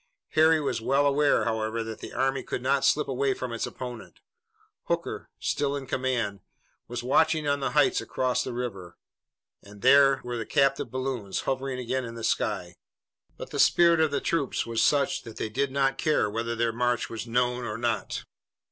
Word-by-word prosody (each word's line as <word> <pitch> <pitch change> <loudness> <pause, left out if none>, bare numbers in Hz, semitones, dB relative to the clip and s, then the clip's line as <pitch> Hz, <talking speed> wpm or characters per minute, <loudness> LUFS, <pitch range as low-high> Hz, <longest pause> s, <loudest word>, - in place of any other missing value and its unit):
Harry 160 +1 +4
was 125 -6 -2
well 140 +5 +2
aware, 145 +1 +3
however, 110 0 -1
that 110 -1 -7
the - - -8
army 135 0 0
could 125 - -5
not 135 +1 +2
slip 150 +2 +3
away 135 0 0
from 125 -2 -5
its 115 - -2
opponent. 125 -2 -8 0.7
Hooker, 170 0 -3
still 145 -1 -1
in 140 -1 -5
command, 125 -6 -1 0.5
was 120 0 -5
watching 155 +4 +2
on 145 0 +1
the 135 - -2
heights 145 -2 +4
across 130 -1 -1
the - - -5
river, 105 -8 -5 0.6
and 100 +1 -15
there 135 +1 +6
were 120 0 -4
the 115 - -4
captive 135 0 +2
balloons 130 -6 -3
hovering 135 -1 -2
again 130 +1 -2
in 115 -1 -7
the 115 - -7
sky. 90 -7 -1 0.6
But - - -8
the - - -4
spirit 170 -1 +5
of 160 -1 +3
the 140 - -1
troops 145 -6 -1
was 115 -1 -1
such 145 -1 +2
that 115 - -11
they 110 - -3
did 135 +5 -1
not 135 0 +1
care 155 -7 +2
whether 115 +2 -2
their 115 0 0
march 120 0 0
was 115 +1 -6
known 125 +1 0
or 105 -2 -4
not. 115 -5 -2
125 Hz, 185 wpm, -27 LUFS, 115-140 Hz, 0.7 s, there